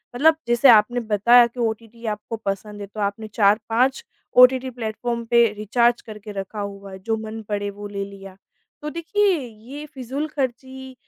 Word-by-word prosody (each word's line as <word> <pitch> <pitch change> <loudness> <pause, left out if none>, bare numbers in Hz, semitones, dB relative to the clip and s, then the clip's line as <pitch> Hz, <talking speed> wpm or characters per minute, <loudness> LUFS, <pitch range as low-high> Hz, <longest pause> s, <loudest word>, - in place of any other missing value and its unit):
मतलब 315 +6 +5
जैसे 240 +3 +5
आपने 235 +2 +5
बताया 235 +2 +5
कि 235 +1 -13
ओटीटी 230 0 -4
आपको 210 +1 -4
पसंद 205 +1 -4
है 200 - -6
तो 210 +2 -10
आपने 205 +2 -2
4-5 225 +5 +2 0.3
ओटीटी 255 +1 +6
प्लेटफ़ार्म 235 0 -4
पे 235 +1 +5
रिचार्ज 235 +3 +1
करके 215 -1 -10
रखा 195 +2 -6
हुआ 200 -1 -6
है, 190 - -9
जो 225 +3 -2
मन 220 0 -7
पड़े 205 -1 -2
वो 205 +1 -8
ले 200 -1 -4
लिया। 195 -1 -12 0.4
तो 300 - -4
देखिए, 360 +4 +1
ये 250 +3 -9
फ़िज़ूलख़र्ची 265 -2 -5
225 Hz, 165 wpm, -22 LUFS, 210-250 Hz, 0.4 s, ओटीटी